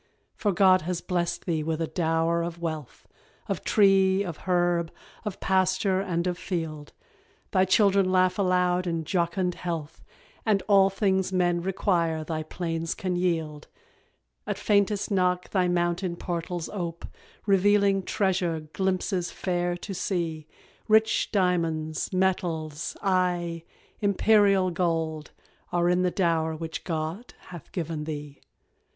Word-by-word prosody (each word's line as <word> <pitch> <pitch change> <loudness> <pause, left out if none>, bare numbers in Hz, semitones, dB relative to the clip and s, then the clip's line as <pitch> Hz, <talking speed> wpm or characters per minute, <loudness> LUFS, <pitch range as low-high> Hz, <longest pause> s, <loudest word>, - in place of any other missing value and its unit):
For 205 - 0
God 185 0 +5
has 175 +2 -2
blest 175 -2 -2
thee 165 -3 0
with 160 +1 -2
a 165 - 0
dower 165 0 0
of 170 0 -4
wealth, 155 -6 -6 0.4
Of - - -3
tree, 195 -1 +4
of 170 -5 -5
herb, 175 -2 +1 0.3
of 210 -3 -4
pasture, 190 0 +1
and 175 -3 -1
of 180 -1 -2
field: 160 -6 -4 0.6
Thy 185 -1 +3
children 195 -1 +3
laugh 185 +1 +2
aloud 180 -1 +2
in 165 -1 -1
jocund 180 +2 0
health, 165 -3 -5 0.4
And 205 -4 +1
all 195 -2 +5
things 190 -1 0
men 175 -2 +1
require 170 -4 0
thy 155 0 -3
plains 165 0 -3
can 185 -1 -2
yield; 160 -4 -1 0.8
At - - -2
faintest 205 0 +1
knock 180 -2 +1
thy 185 -2 +2
mountain 175 0 0
portals 175 -1 -4
ope, 170 -4 -5 0.4
Revealing 200 0 +3
treasure 185 -4 0
glimpses 190 -1 -1
fair 175 -1 -2
to 195 +3 -7
see 165 -5 -2 0.4
Rich 220 0 +3
diamonds, 165 -5 0
metals, 170 -5 -1
aye, 175 -3 0 0.3
Imperial 200 -2 +3
gold, 165 -3 -1 0.4
Are 175 0 +2
in 180 0 +2
the 180 - +2
dower 165 -3 0
which 160 0 -6
God 165 +7 -4
hath 175 -4 -10
given 160 -3 -4
thee. 145 -2 -7
180 Hz, 130 wpm, -26 LUFS, 165-190 Hz, 0.8 s, God